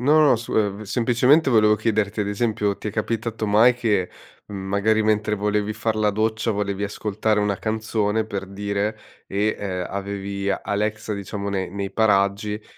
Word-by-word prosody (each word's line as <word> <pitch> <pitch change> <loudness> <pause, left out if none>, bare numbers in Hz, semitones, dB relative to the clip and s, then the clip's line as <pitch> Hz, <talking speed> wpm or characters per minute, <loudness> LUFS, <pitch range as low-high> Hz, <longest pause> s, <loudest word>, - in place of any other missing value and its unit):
No, 150 +5 +4
no, 145 -6 +5
su 115 - -6
ev 105 -1 0
semplicemente 125 +7 +3
volevo 105 -2 +5
chiederti: 110 -1 0
ad 100 - -1
esempio, 105 -1 -1
ti - - -7
è - - -1
capitato 110 0 -2
mai 115 +4 +5
che, 105 -7 0 0.4
mhmm, 105 - -7
magari 110 +2 +2
mentre 105 0 +1
volevi 105 +1 0
far 110 0 -2
la 105 -1 +2
doccia, 110 +2 0
volevi 100 0 -2
ascoltare 105 +1 -1
una 100 -2 0
canzone, 110 0 -1
per 100 -2 -5
dire, 100 +2 -2 0.3
e, 105 +2 0
ehm, 90 -3 -3
avevi 100 0 -4
Alexa 105 +2 -2
diciamo 100 0 -5
ne 95 -2 -2
nei 100 +1 -4
paraggi 105 0 +1
105 Hz, 165 wpm, -23 LUFS, 100-110 Hz, 0.4 s, no